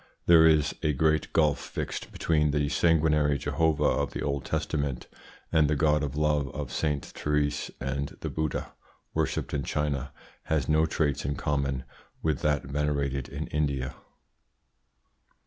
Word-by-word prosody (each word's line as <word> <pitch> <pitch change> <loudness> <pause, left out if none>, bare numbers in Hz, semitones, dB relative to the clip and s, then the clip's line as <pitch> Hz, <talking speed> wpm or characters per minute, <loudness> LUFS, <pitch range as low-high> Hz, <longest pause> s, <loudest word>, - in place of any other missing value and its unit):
There 80 -1 +7
is 80 -2 +3
a 75 - +1
great 80 +2 +1
gulf 75 -3 +3
fixed - - -5
between 75 -2 +1
the 75 0 +1
sanguinary 75 -3 +3
Jehovah 80 +3 +1
of - - +1
the - - -3
Old 70 -3 -2
Testament 70 -5 -2 0.5
and 80 -2 +4
the 75 - +2
God 75 0 +3
of 70 -2 -3
Love 75 -2 +1
of 70 -3 -4
Sainte 75 +1 -1
Therese, 75 -1 -1
and 70 +2 -3
the - - -3
Buddha 80 -3 -3 0.4
worshipped - - -1
in 70 - 0
China 70 -2 -2 0.3
has 75 -5 0
no 80 +1 +3
traits 75 -3 0
in 70 +1 -1
common 70 -2 -1 0.4
with 80 -4 +1
that 75 -1 +1
venerated 70 -1 -1
in - - -4
India. 70 -4 -1
75 Hz, 145 wpm, -28 LUFS, 70-75 Hz, 0.5 s, There